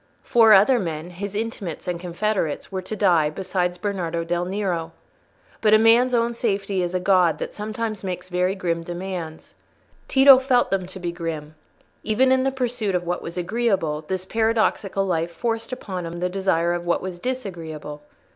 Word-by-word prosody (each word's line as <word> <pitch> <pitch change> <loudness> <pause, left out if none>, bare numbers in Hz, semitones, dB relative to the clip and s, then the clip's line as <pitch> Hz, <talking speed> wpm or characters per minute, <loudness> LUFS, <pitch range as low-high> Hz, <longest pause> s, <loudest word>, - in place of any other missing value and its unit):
Four 225 -3 +6
other 215 +6 +6
men—his 180 +3 -5
intimates 210 -6 -4
and 175 -1 -2
confederates—were 185 0 -2
to 185 +4 -6
die, 175 -7 +3
besides 180 +1 -2
Bernardo 175 -4 -2
del 175 +1 -1
Nero. 180 -4 -2 0.7
But 215 -1 +5
a - - +8
man's 235 +3 +5
own 235 0 +1
safety 200 -4 -1
is 175 0 -2
a - - +2
god 180 -3 +3
that - - -5
sometimes 215 0 -4
makes 185 -2 -4
very 180 +1 0
grim 170 -3 -1
demands. 175 -2 -6 0.5
Tito 270 -1 +8
felt 260 -2 +2
them 190 -2 0
to 190 +1 -10
be 175 -1 -3
grim: 165 -3 -5 0.5
even 250 +5 +2
in 260 0 +4
the 270 - +1
pursuit 245 -6 -1
of 180 - 0
what 175 +1 -2
was 170 +2 -7
agreeable, 180 -6 0
this 185 -1 -3
paradoxical 220 -2 +1
life 170 -2 0
forced 225 +6 -3
upon 185 -8 -5
him 170 +1 -6
the 180 +1 0
desire 180 -3 +1
for - - -10
what 170 - +1
was 185 -2 -5
disagreeable. 165 - -5
190 Hz, 170 wpm, -23 LUFS, 175-220 Hz, 0.7 s, a